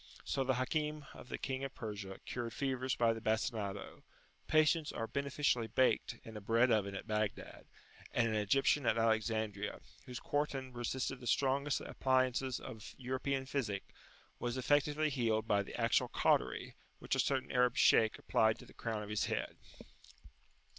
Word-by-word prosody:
So 135 Hz, -, 0 dB
the 130 Hz, 0 st, +1 dB
Hakim 150 Hz, +3 st, -1 dB
of 125 Hz, -, -12 dB
the -, -, -3 dB
King 135 Hz, -1 st, -3 dB
of 135 Hz, -1 st, -5 dB
Persia 100 Hz, -4 st, -6 dB
cured 120 Hz, -2 st, -4 dB
fevers 130 Hz, -2 st, -1 dB
by 115 Hz, -1 st, +3 dB
the 115 Hz, -, -7 dB
bastinado; 110 Hz, -2 st, -2 dB, 0.5 s
patients 155 Hz, 0 st, +3 dB
are 115 Hz, -, -3 dB
beneficially 140 Hz, -2 st, 0 dB
baked 125 Hz, -1 st, +2 dB
in 110 Hz, -, -10 dB
a 105 Hz, -, -6 dB
bread 115 Hz, +4 st, +3 dB
oven 100 Hz, -3 st, +1 dB
at -, -, -5 dB
Baghdad; 105 Hz, -1 st, -3 dB, 0.4 s
and 120 Hz, -, +2 dB
an 110 Hz, -, -1 dB
Egyptian 115 Hz, +6 st, +2 dB
at 115 Hz, -, +3 dB
Alexandria, 110 Hz, -2 st, 0 dB, 0.3 s
whose 125 Hz, -1 st, -5 dB
quartan 135 Hz, -3 st, -2 dB
resisted 125 Hz, +2 st, -2 dB
the 125 Hz, -, -8 dB
strongest 140 Hz, +3 st, +1 dB
appliances 130 Hz, -1 st, +1 dB
of 115 Hz, +2 st, -9 dB
European 130 Hz, +1 st, -2 dB
physic, 115 Hz, -8 st, -3 dB, 0.5 s
was 120 Hz, +1 st, -2 dB
effectually 145 Hz, +3 st, +2 dB
healed 115 Hz, -4 st, 0 dB
by 100 Hz, -2 st, +3 dB
the 100 Hz, -, -7 dB
actual -, -, +3 dB
cautery, -, -, +1 dB, 0.2 s
which -, -, -3 dB
a -, -, +1 dB
certain 135 Hz, -2 st, +1 dB
Arab 125 Hz, 0 st, +3 dB
Shaykh 110 Hz, -1 st, +5 dB
applied 110 Hz, 0 st, +2 dB
to -, -, -12 dB
the -, -, -16 dB
crown 110 Hz, -2 st, -3 dB
of 105 Hz, -, -8 dB
his 105 Hz, -1 st, 0 dB
head. -, -, -2 dB
125 Hz, 160 wpm, -35 LUFS, 110-135 Hz, 0.5 s, Shaykh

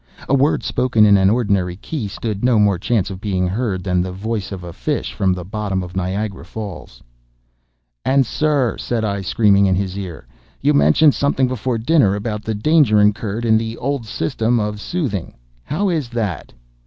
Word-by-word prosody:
A -, -, 0 dB
word 140 Hz, +3 st, +2 dB
spoken 115 Hz, -4 st, +2 dB
in 100 Hz, -1 st, +6 dB
an 95 Hz, -1 st, +4 dB
ordinary 100 Hz, -6 st, +1 dB
key 115 Hz, -, -5 dB
stood 105 Hz, +1 st, -5 dB
no 125 Hz, -2 st, +4 dB
more 100 Hz, -4 st, +3 dB
chance 105 Hz, -1 st, 0 dB
of 95 Hz, 0 st, -8 dB
being 95 Hz, -4 st, 0 dB
heard 95 Hz, -2 st, -2 dB
than 90 Hz, -2 st, +1 dB
the 90 Hz, +1 st, -3 dB
voice 105 Hz, +1 st, -4 dB
of 95 Hz, -2 st, -6 dB
a 85 Hz, -1 st, -8 dB
fish -, -, -3 dB
from 95 Hz, -1 st, +1 dB
the 90 Hz, -1 st, -3 dB
bottom 100 Hz, -2 st, -3 dB
of 90 Hz, +1 st, -9 dB
Niagara 95 Hz, +1 st, -3 dB
Falls. 95 Hz, -, -8 dB, 1.0 s
"And, 135 Hz, 0 st, +3 dB
sir," 145 Hz, -2 st, 0 dB
said 115 Hz, -2 st, -1 dB
I, 100 Hz, -1 st, -2 dB
screaming 100 Hz, 0 st, +3 dB
in 95 Hz, -, +2 dB
his 95 Hz, -1 st, -2 dB
ear, 90 Hz, -9 st, -7 dB, 0.3 s
"you -, -, +2 dB
mentioned 75 Hz, -, +5 dB
something 140 Hz, -2 st, +1 dB
before 125 Hz, -1 st, -2 dB
dinner 115 Hz, -4 st, +3 dB
about 105 Hz, 0 st, -3 dB
the 110 Hz, 0 st, -2 dB
danger 135 Hz, -2 st, +4 dB
incurred 105 Hz, +2 st, +1 dB
in 110 Hz, -1 st, +4 dB
the 115 Hz, 0 st, -5 dB
old 135 Hz, -3 st, -3 dB
system 120 Hz, 0 st, 0 dB
of 105 Hz, -1 st, -3 dB
soothing. 130 Hz, -, -3 dB, 0.3 s
How 190 Hz, +7 st, -1 dB
is 155 Hz, -8 st, -1 dB
that?" 105 Hz, -, -3 dB
105 Hz, 185 wpm, -19 LUFS, 95-120 Hz, 1.0 s, in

